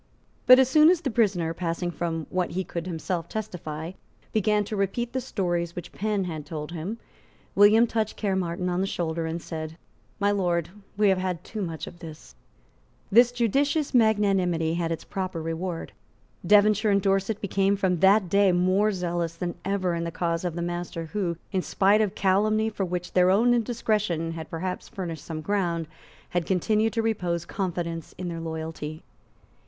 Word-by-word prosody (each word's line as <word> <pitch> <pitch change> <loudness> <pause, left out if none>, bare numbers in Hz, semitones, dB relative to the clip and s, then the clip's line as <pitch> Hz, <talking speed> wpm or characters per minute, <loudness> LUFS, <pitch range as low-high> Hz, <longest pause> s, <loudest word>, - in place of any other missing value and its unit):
But 255 0 +10
as 265 -1 +5
soon 305 +4 +6
as 355 -2 +3
the 270 - -2
prisoner, 190 -8 +1
passing 175 +1 -2
from 165 -2 -3
what 180 -1 0
he 190 +2 -1
could 170 -1 -5
himself 170 0 -3
testify, 170 -6 -5 0.4
began 210 0 +2
to 210 - -5
repeat 210 +5 -1
the 260 - -1
stories 175 -6 -2
which 175 -1 -7
Penn 210 -1 -1
had 160 -4 -5
told 150 +1 -6
him, 175 +7 -4 0.6
William 210 +3 +6
touched 220 -2 -2
Caermarthen 185 -3 -1
on 180 +1 0
the 195 - 0
shoulder 165 -2 -2
and 165 +1 -3
said, 160 -1 -6 0.4
"My 205 0 +3
Lord, 175 -5 0 0.3
we 210 -1 +4
have 190 -1 +3
had 185 -3 -3
too 215 - -6
much 165 -4 -4
of 175 - -11
this." 160 -2 -11 0.8
This 240 +3 +6
judicious 275 +6 +1
magnanimity 195 -8 +3
had 170 -1 -1
its 165 - -3
proper 185 -3 -4
reward. 165 +1 -4 0.5
Devonshire 210 +1 +4
and 200 -1 +4
Dorset 195 +2 0
became 195 0 +1
from 185 -3 0
that 195 +1 +5
day 200 +1 +4
more 185 +4 +3
zealous 175 -3 -2
than 175 0 -3
ever 190 -2 0
in 170 0 -2
the 170 - -2
cause 170 0 -2
of 175 -3 -2
the 170 - -2
master 175 -1 -4
who, 180 -5 -1
in 190 -3 +1
spite 200 +4 +3
of 210 -3 0
calumny 215 +3 +2
for 200 -2 -2
which 180 0 -4
their 180 0 +5
own 230 +6 +4
indiscretion 215 -8 0
had 160 -1 -7
perhaps 180 +3 -4
furnished 165 -6 -5
some 155 -2 -5
ground, 170 -4 -1 0.4
had 175 -2 -1
continued 215 +4 +1
to 225 -1 0
repose 175 -6 -1
confidence 170 -4 -4
in 180 -1 -4
their 165 -1 -5
loyalty. 160 -1 -5
185 Hz, 175 wpm, -26 LUFS, 170-210 Hz, 0.8 s, But